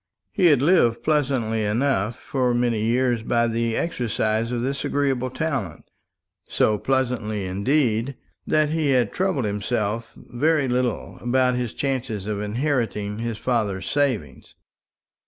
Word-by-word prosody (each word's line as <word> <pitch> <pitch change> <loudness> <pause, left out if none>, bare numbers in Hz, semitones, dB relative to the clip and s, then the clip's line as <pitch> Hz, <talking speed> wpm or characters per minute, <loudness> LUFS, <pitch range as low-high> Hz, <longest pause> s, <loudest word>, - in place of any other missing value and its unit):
He 180 - +3
had 145 -5 +4
lived 140 -9 +3
pleasantly 130 -8 +1
enough, 110 0 0
for 125 -3 0
many 120 -3 +1
years, 120 0 +1
by 120 +1 +1
the 115 0 -1
exercise 115 -6 -1
of 120 -1 -1
this 135 +2 -2
agreeable 135 -3 0
talent; 130 - -3 0.6
so 105 -1 +2
pleasantly 120 -6 -1
indeed 115 +5 0 0.3
that 155 -1 +2
he 160 -2 0
had 125 -3 +2
troubled 185 - 0
himself 105 +2 -2
very 145 +3 0
little 125 -1 -1
about 125 +1 +2
his 125 -3 -3
chances 120 -7 -2
of 105 -1 -3
inheriting 110 -3 -1
his 115 -1 -3
father's 105 -6 -1
savings. 125 - -1
120 Hz, 130 wpm, -23 LUFS, 110-135 Hz, 0.6 s, had